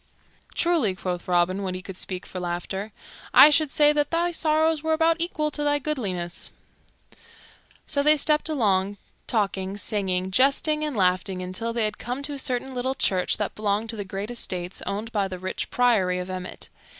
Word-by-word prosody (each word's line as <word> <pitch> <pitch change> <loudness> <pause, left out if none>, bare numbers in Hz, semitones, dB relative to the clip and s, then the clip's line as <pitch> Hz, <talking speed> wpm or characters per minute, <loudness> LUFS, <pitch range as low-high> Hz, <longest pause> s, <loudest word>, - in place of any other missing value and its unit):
"Truly," 320 - +2
quoth 180 -2 -4
Robin, 180 +2 +2
when 185 -2 -3
he 185 - -7
could 190 -1 -8
speak 185 0 -5
for 185 - -7
laughter, 180 +4 -4 0.4
"I 300 - +10
should 300 0 +3
say 295 +1 +4
that 295 -1 +1
thy 340 +1 +1
sorrows 315 -1 +2
were 320 0 0
about 325 +1 +3
equal 310 -3 0
to 295 - -3
thy 290 0 +3
goodliness." 200 - -3 1.3
So 280 - 0
they 305 +1 +5
stepped 300 +2 +3
along, 205 -8 +1 0.3
talking, 195 -3 -1
singing, 190 -3 -2
jesting, 280 - +3
and 295 -6 -3
laughing, 185 0 +1
until 185 +6 -3
they 230 -1 0
had 210 -1 -3
come 250 +4 -4
to 290 0 -2
a 280 - -1
certain 260 0 -1
little 260 +1 -1
church 185 -7 +1
that 210 - -2
belonged 210 +1 -1
to - - -7
the 205 - -4
great 195 +3 -5
estates 180 -6 -3
owned 210 +3 -3
by 205 -3 0
the 185 -1 -6
rich 185 +1 -4
Priory 215 -8 +2
of 180 +1 -5
Emmet. 185 0 -7
215 Hz, 185 wpm, -25 LUFS, 185-290 Hz, 1.3 s, I